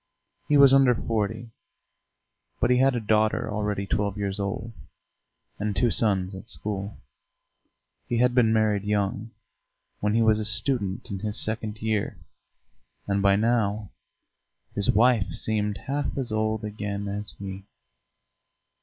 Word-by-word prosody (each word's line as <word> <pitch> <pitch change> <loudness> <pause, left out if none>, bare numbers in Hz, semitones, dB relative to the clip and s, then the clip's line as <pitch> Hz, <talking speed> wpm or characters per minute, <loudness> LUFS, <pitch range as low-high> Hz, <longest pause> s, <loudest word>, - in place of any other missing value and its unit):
He 145 - +4
was 140 -1 +7
under 135 -3 +5
forty, 115 +1 -3 1.1
but - - +2
he 125 - +4
had 135 0 +3
a - - 0
daughter 110 0 +1
already 105 -1 -2
twelve 100 0 -1
years 100 0 0
old, 100 +3 -4 0.9
and 105 -1 -2
two 115 +4 +2
sons 95 -4 +2
at 95 - -9
school. 100 -1 -3 1.1
He 120 - -1
had 125 +1 +3
been 120 -3 +4
married 110 -2 +2
young, 105 +1 -1 0.7
when 105 +1 0
he 115 - +3
was 110 -1 +3
a - - -2
student 110 -1 +1
in 100 - -4
his 105 +1 -3
second 110 0 -3
year, 110 -2 -1 0.9
and 100 0 0
by 100 0 +4
now 105 -2 0 0.8
his 100 -1 -1
wife 115 -1 +3
seemed 105 -2 -1
half 140 +1 -3
as 130 -5 -3
old 110 0 -1
again 105 -1 -4
as 100 +1 -4
he. 95 -1 -7
105 Hz, 140 wpm, -25 LUFS, 100-115 Hz, 1.1 s, was